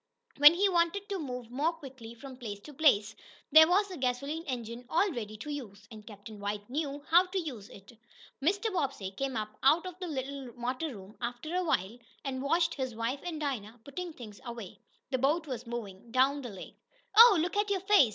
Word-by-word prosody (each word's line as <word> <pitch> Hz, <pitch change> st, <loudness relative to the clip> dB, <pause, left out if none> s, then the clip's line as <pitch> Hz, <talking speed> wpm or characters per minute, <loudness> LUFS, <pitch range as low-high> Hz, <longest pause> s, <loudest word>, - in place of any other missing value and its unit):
When 295 Hz, +3 st, +9 dB
he 400 Hz, +3 st, +4 dB
wanted 360 Hz, +2 st, +1 dB
to 395 Hz, -2 st, -2 dB
move 250 Hz, -5 st, -6 dB
more 295 Hz, +7 st, +1 dB
quickly 260 Hz, -7 st, -11 dB
from 260 Hz, +2 st, -10 dB
place 220 Hz, -5 st, -6 dB
to 300 Hz, -, -11 dB
place, 225 Hz, -8 st, +3 dB, 0.4 s
there 315 Hz, 0 st, +9 dB
was 390 Hz, +4 st, +3 dB
the 370 Hz, -3 st, -7 dB
gasoline 275 Hz, +5 st, -2 dB
engine 240 Hz, -2 st, -4 dB
all 360 Hz, +6 st, +2 dB
ready 215 Hz, -6 st, -5 dB
to 295 Hz, +8 st, -6 dB
use. 210 Hz, -8 st, -7 dB
And 215 Hz, -1 st, -11 dB
Captain 210 Hz, 0 st, -10 dB
White 205 Hz, 0 st, -4 dB
knew 285 Hz, 0 st, -3 dB
how 355 Hz, +2 st, +7 dB
to 375 Hz, +2 st, -4 dB
use 250 Hz, -, -6 dB
it. 195 Hz, +2 st, -14 dB, 0.5 s
Mr. 400 Hz, +8 st, +1 dB
Bobbsey 270 Hz, -, -2 dB
came 265 Hz, +4 st, -3 dB
up 215 Hz, 0 st, -4 dB
out 315 Hz, +6 st, +4 dB
of 365 Hz, -1 st, -7 dB
the 365 Hz, -, -4 dB
little 270 Hz, -3 st, -5 dB
motor 255 Hz, +4 st, -3 dB
room 195 Hz, +3 st, -13 dB
after 245 Hz, +7 st, -4 dB
a 365 Hz, 0 st, +1 dB
while, 230 Hz, -, 0 dB, 0.3 s
and 260 Hz, -1 st, -3 dB
watched 330 Hz, +5 st, +2 dB
his 260 Hz, -4 st, -4 dB
wife 230 Hz, +5 st, -2 dB
and 335 Hz, -3 st, -4 dB
Dinah 245 Hz, -6 st, -4 dB
putting 345 Hz, +5 st, -5 dB
things 215 Hz, -7 st, -11 dB
away. 235 Hz, -6 st, -8 dB, 0.3 s
The 260 Hz, -, +1 dB
boat 305 Hz, +6 st, +2 dB
was 250 Hz, -4 st, -6 dB
moving 230 Hz, -3 st, -6 dB
down 270 Hz, +3 st, +3 dB
the 245 Hz, -, -6 dB
lake. 195 Hz, -3 st, -10 dB, 0.4 s
"Oh, 455 Hz, -3 st, +10 dB
look 345 Hz, +5 st, -1 dB
at 415 Hz, 0 st, +1 dB
your 390 Hz, -2 st, 0 dB
face!" 385 Hz, -, +5 dB
270 Hz, 205 wpm, -31 LUFS, 230-325 Hz, 0.5 s, Oh